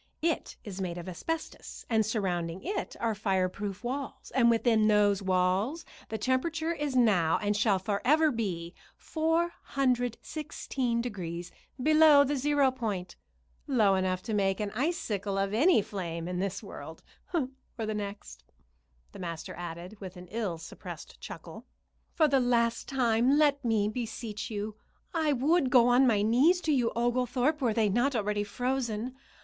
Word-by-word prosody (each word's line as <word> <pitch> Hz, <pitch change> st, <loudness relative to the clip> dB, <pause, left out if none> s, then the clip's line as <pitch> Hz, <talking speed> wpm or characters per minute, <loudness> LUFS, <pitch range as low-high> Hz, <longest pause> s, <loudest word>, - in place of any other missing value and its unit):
It 330 Hz, -2 st, -1 dB
is 195 Hz, -2 st, -6 dB
made 175 Hz, -2 st, -3 dB
of 175 Hz, -, -7 dB
asbestos 315 Hz, -, -5 dB
and 220 Hz, -2 st, +2 dB
surrounding 185 Hz, -5 st, -2 dB
it 400 Hz, +4 st, -3 dB
are 230 Hz, -1 st, 0 dB
fireproof 195 Hz, 0 st, -2 dB
walls, 265 Hz, +2 st, -5 dB
and 240 Hz, -2 st, +5 dB
within 225 Hz, -2 st, +3 dB
those 205 Hz, -1 st, +3 dB
walls 190 Hz, -, +1 dB, 0.2 s
the 220 Hz, -, -2 dB
temperature 315 Hz, +8 st, 0 dB
is 295 Hz, -4 st, -3 dB
now 195 Hz, -10 st, +4 dB
and 205 Hz, -1 st, 0 dB
shall 205 Hz, -1 st, +3 dB
forever 260 Hz, +12 st, +2 dB
be 180 Hz, -8 st, -3 dB, 0.2 s
416 275 Hz, -5 st, -1 dB
degrees 175 Hz, -7 st, -5 dB, 0.3 s
below 305 Hz, +1 st, +6 dB
the 285 Hz, +1 st, -1 dB
zero 285 Hz, 0 st, +3 dB
point; 210 Hz, -8 st, -4 dB, 0.5 s
low 220 Hz, -8 st, +4 dB
enough 185 Hz, -1 st, 0 dB
to 220 Hz, -, -4 dB
make 195 Hz, -2 st, +1 dB
an 210 Hz, -1 st, -2 dB
icicle 215 Hz, -, -2 dB
of 195 Hz, +1 st, 0 dB
any 280 Hz, -, +4 dB
flame 170 Hz, -5 st, -5 dB
in 180 Hz, 0 st, -3 dB
this 195 Hz, +1 st, -3 dB
world -, -, -9 dB, 0.3 s
or 295 Hz, -8 st, 0 dB, 0.3 s
the 215 Hz, -, -2 dB
next," 200 Hz, -, -6 dB, 0.7 s
the -, -, -11 dB
master 170 Hz, -3 st, -5 dB
added, 175 Hz, +4 st, -8 dB
with 185 Hz, -1 st, -8 dB
an 180 Hz, -, -9 dB
ill 210 Hz, -6 st, -2 dB
suppressed 160 Hz, -, -10 dB
chuckle. -, -, -9 dB, 0.5 s
"For 315 Hz, -, +4 dB
the 275 Hz, -2 st, +3 dB
last 235 Hz, -2 st, +1 dB
time 250 Hz, 0 st, +2 dB
let 285 Hz, -2 st, +3 dB
me 220 Hz, -3 st, +2 dB
beseech 220 Hz, -1 st, -4 dB
you. 210 Hz, 0 st, -4 dB, 0.4 s
I 320 Hz, -3 st, +1 dB
would 285 Hz, +2 st, +2 dB
go 245 Hz, -2 st, +6 dB
on 255 Hz, +2 st, +5 dB
my 210 Hz, -4 st, +3 dB
knees 265 Hz, -, +4 dB
to 315 Hz, -, 0 dB
you, 250 Hz, -5 st, +2 dB
Oglethorpe, 250 Hz, +5 st, +1 dB
were 245 Hz, -4 st, +2 dB
they 220 Hz, -2 st, +3 dB
not 240 Hz, +7 st, +1 dB
already 210 Hz, -1 st, 0 dB
frozen. 245 Hz, +1 st, -2 dB
225 Hz, 150 wpm, -29 LUFS, 195-265 Hz, 0.7 s, below